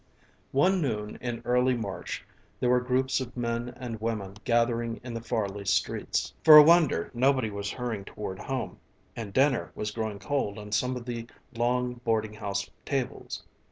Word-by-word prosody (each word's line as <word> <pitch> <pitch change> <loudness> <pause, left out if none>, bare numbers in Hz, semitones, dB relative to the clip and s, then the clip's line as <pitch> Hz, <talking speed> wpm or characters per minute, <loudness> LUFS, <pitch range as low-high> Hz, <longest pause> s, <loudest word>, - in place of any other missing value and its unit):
One 180 +7 +3
noon 105 -7 -2
in 120 -1 -4
early 125 +1 +3
March 100 -6 -5 0.3
there 125 - +2
were 125 - +5
groups 130 +2 +1
of 125 0 -7
men 120 0 -1
and 120 -3 -6
women 105 -4 -2
gathering 115 -1 +1
in 120 -1 -6
the 115 - -4
Farley 105 -4 -2
streets. 100 - 0
For 155 -1 +11
a 150 - +12
wonder, 165 - +4
nobody 130 -2 +2
was 100 0 -4
hurrying 115 -4 -4
toward 95 -3 -6
home 130 +2 -4 0.4
and 110 -4 -5
dinner 135 +3 +2
was 105 0 -3
growing 110 -1 -3
cold 135 -4 -2
on 105 0 -8
some 125 +5 +1
of 120 -1 -6
the 120 -1 -5 0.3
long 125 +1 0
boarding 110 -2 0
house 100 -2 -3 0.2
tables. 135 -3 -3
120 Hz, 165 wpm, -28 LUFS, 105-125 Hz, 0.4 s, a